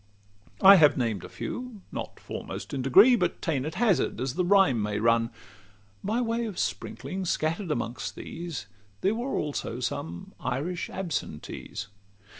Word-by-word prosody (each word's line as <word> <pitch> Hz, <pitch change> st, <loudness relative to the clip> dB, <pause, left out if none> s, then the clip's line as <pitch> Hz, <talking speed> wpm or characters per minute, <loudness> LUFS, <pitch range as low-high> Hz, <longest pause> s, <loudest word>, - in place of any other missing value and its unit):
I 195 Hz, 0 st, +10 dB
have 150 Hz, -4 st, +6 dB
named 115 Hz, -7 st, -1 dB
a -, -, -8 dB
few, 245 Hz, -6 st, -6 dB
not -, -, -6 dB
foremost -, -, -6 dB
in 135 Hz, -, -1 dB
degree, 200 Hz, -, +7 dB
But 180 Hz, -6 st, 0 dB
ta'en 145 Hz, -5 st, -1 dB
at 155 Hz, -, -5 dB
hazard 215 Hz, -, +2 dB
as 130 Hz, 0 st, -1 dB
the 180 Hz, -, +1 dB
rhyme 180 Hz, -, +4 dB
may 105 Hz, 0 st, -1 dB
run. 115 Hz, +1 st, +3 dB, 0.7 s
By 220 Hz, +5 st, 0 dB
way 230 Hz, 0 st, 0 dB
of 205 Hz, -, -7 dB
sprinkling, 190 Hz, 0 st, -3 dB
scatter'd 165 Hz, +3 st, -1 dB
amongst 120 Hz, -4 st, -3 dB
these, 165 Hz, -, -6 dB, 0.4 s
There 195 Hz, -, +2 dB
also 225 Hz, -, -2 dB
were 125 Hz, -, -6 dB
some 85 Hz, -8 st, -4 dB
Irish 170 Hz, +7 st, -2 dB
absentees. 180 Hz, -5 st, -4 dB
165 Hz, 150 wpm, -28 LUFS, 125-200 Hz, 0.7 s, I